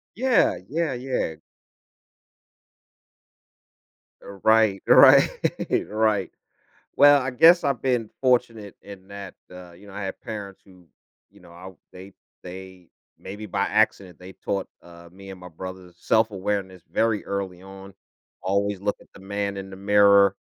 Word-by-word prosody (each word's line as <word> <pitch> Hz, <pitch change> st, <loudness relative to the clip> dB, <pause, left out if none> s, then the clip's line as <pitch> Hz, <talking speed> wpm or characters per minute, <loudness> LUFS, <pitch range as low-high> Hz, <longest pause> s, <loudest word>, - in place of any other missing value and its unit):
Yeah, 250 Hz, -, +2 dB
yeah, 160 Hz, 0 st, -2 dB
yeah. 125 Hz, -9 st, -3 dB, 2.9 s
R 100 Hz, -1 st, -12 dB
right, 110 Hz, -3 st, +3 dB
right, -, -, +7 dB, 0.4 s
right. 105 Hz, -3 st, 0 dB, 0.7 s
Well, 145 Hz, 0 st, +6 dB
I 130 Hz, -, -3 dB
guess 165 Hz, +8 st, +5 dB
I've 140 Hz, -4 st, -1 dB
been 125 Hz, -4 st, -1 dB
fortunate 120 Hz, -6 st, 0 dB
in 100 Hz, -2 st, -13 dB
that, 100 Hz, -2 st, -9 dB, 0.2 s
uh, 90 Hz, -1 st, -12 dB
you 95 Hz, +4 st, -17 dB
know, 100 Hz, -, -13 dB
I 105 Hz, -, -6 dB
had 95 Hz, -, -6 dB
parents 100 Hz, -3 st, -8 dB
who, 90 Hz, -3 st, -20 dB, 0.4 s
you 100 Hz, -, -21 dB
know, 90 Hz, -1 st, -17 dB
I 90 Hz, +2 st, -11 dB, 0.2 s
they 95 Hz, +2 st, -12 dB, 0.3 s
they 95 Hz, -1 st, -11 dB, 0.3 s
maybe 105 Hz, +2 st, -9 dB
by 100 Hz, 0 st, -2 dB
accident, 100 Hz, -4 st, 0 dB
they 90 Hz, +1 st, -12 dB
taught, 100 Hz, 0 st, -4 dB, 0.2 s
uh, 85 Hz, 0 st, -15 dB
me 95 Hz, +1 st, -13 dB
and 95 Hz, -, -10 dB
my 90 Hz, -, -10 dB
brothers 90 Hz, +1 st, -10 dB
self-awareness 100 Hz, -3 st, -1 dB
very 115 Hz, -2 st, 0 dB
early 95 Hz, -2 st, -5 dB
on, 95 Hz, 0 st, -13 dB, 0.5 s
"Always 100 Hz, +1 st, -1 dB
look 105 Hz, 0 st, -2 dB
at -, -, -20 dB
the -, -, -14 dB
man 100 Hz, +1 st, -4 dB
in 95 Hz, 0 st, -8 dB
the 95 Hz, -, -10 dB
mirror," 100 Hz, 0 st, +4 dB
100 Hz, 145 wpm, -23 LUFS, 95-110 Hz, 2.9 s, right